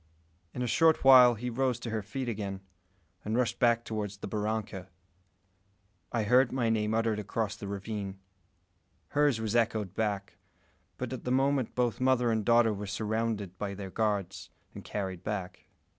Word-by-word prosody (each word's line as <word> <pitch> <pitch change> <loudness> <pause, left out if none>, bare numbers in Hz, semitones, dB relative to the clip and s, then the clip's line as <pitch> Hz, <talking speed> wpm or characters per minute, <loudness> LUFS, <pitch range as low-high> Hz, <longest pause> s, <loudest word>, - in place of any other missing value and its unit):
In 125 - -4
a - - -1
short 160 +6 +3
while 125 -2 +8
she 125 +3 -4
rose 125 0 0
to 115 - -5
her 110 -1 -1
feet 130 +6 -5
again, 100 -4 -4 0.6
and 110 +2 -1
rushed 125 -2 0
back 120 -1 +3
toward 105 -2 -3
the 100 +1 -9
barranca. 105 -3 -3 1.2
I 115 -2 0
heard 125 +4 +4
my 120 -4 +1
name 110 0 0
uttered 115 -1 +1
across 105 +1 -2
the 100 - -8
ravine. 100 0 -5 0.9
Hers 145 -5 +2
was 110 0 -2
echoed 110 -5 +1
back; 100 -2 -2 0.6
but - - -4
at - - -6
the 125 - -2
moment 135 -1 +1
both 125 -1 0
mother 130 -2 +3
and 110 -1 0
daughter 115 0 +4
were 100 0 -6
surrounded 105 -2 -2
by 100 -1 -3
their 95 -1 -7
guards, 100 -4 -2 0.2
and - - -9
carried 95 -3 -4
back. 95 -3 -5
110 Hz, 165 wpm, -30 LUFS, 100-120 Hz, 1.2 s, while